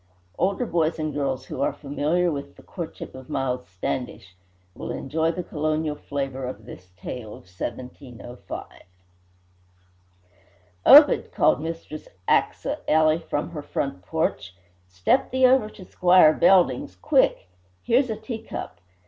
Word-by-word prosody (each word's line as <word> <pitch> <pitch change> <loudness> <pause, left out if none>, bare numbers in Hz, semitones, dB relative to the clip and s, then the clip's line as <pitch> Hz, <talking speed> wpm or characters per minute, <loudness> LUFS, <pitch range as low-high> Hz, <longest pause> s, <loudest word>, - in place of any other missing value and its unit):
Older 195 +7 +1
boys 165 -4 0
and 155 -1 -3
girls 135 -2 -2
who - - -6
are - - +2
familiar 155 +5 -1
with 140 -1 -6
"The - - -17
Courtship 170 -4 -7
of 130 -1 -12
Miles 125 -1 -2
Standish" 95 0 -5 0.4
will - - -7
enjoy 160 +4 -1
the 180 +1 -5
colonial 155 -1 -2
flavour 135 -2 -4
of 110 -4 -8
this 90 -6 -12
tale 110 +4 -7
of - - -15
1705. 120 +5 -8 2.2
"Obed!" - - +8
called - - +2
Mistress 160 -1 -6 0.2
Achsah - - +1
Ely 155 +1 +4
from 155 -1 -4
her 155 -3 -6
front 140 -8 -4
porch, 90 0 -2 0.3
"step 90 - +1
thee 260 0 +3
over 255 -4 +4
to 185 - -13
Squire 180 -4 +5
Belding's, 195 - +3
quick! 295 - +2 0.4
Here's 250 +2 +2
a 220 - -1
teacup! 225 - -7
155 Hz, 130 wpm, -24 LUFS, 130-175 Hz, 2.2 s, Obed